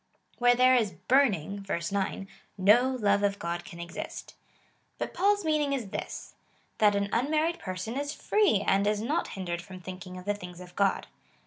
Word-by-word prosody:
Where 245 Hz, 0 st, +5 dB
there 255 Hz, +1 st, +5 dB
is 225 Hz, -6 st, +2 dB
burning, 205 Hz, -, +2 dB
(verse 170 Hz, -3 st, -3 dB
9,) 195 Hz, 0 st, -2 dB, 0.3 s
no 210 Hz, +7 st, +5 dB
love 200 Hz, -2 st, +3 dB
of 200 Hz, 0 st, +1 dB
God 170 Hz, -1 st, -3 dB
can 170 Hz, -, -11 dB
exist. 170 Hz, 0 st, -7 dB, 0.6 s
But -, -, -4 dB
Paul's 405 Hz, -1 st, +2 dB
meaning 300 Hz, -2 st, +1 dB
is 240 Hz, -7 st, -3 dB
this -, -, -6 dB, 0.2 s
— -, -, -39 dB
that 210 Hz, -1 st, +5 dB
an 200 Hz, 0 st, 0 dB
unmarried 310 Hz, +7 st, +1 dB
person 185 Hz, +5 st, -5 dB
is 285 Hz, +1 st, -2 dB
free, 395 Hz, -, +2 dB
and 200 Hz, +1 st, +3 dB
is 210 Hz, 0 st, +1 dB
not 265 Hz, +9 st, -1 dB
hindered 175 Hz, -2 st, -3 dB
from 185 Hz, 0 st, -10 dB
thinking 185 Hz, 0 st, -8 dB
of 180 Hz, -, -10 dB
the 205 Hz, -, +1 dB
things 180 Hz, -3 st, -9 dB
of 180 Hz, -1 st, -12 dB
God. 200 Hz, -1 st, +1 dB
205 Hz, 185 wpm, -28 LUFS, 185-255 Hz, 0.6 s, Where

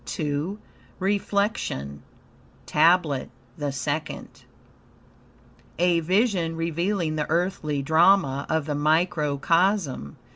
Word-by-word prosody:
II 150 Hz, +6 st, -2 dB, 0.4 s
REFLECTION 200 Hz, -, -1 dB, 0.6 s
TABLET 160 Hz, -3 st, +2 dB, 0.3 s
THE 145 Hz, -2 st, -3 dB
SECOND 145 Hz, +4 st, -5 dB, 1.3 s
A 175 Hz, 0 st, +3 dB
vision 180 Hz, -1 st, +1 dB
revealing 170 Hz, 0 st, -1 dB
the 150 Hz, -, -2 dB
earthly 155 Hz, -4 st, -1 dB
drama 160 Hz, -2 st, +3 dB
of 160 Hz, -2 st, 0 dB
the 150 Hz, -, -2 dB
microcosm. 155 Hz, -, +1 dB
160 Hz, 80 wpm, -25 LUFS, 145-180 Hz, 1.3 s, A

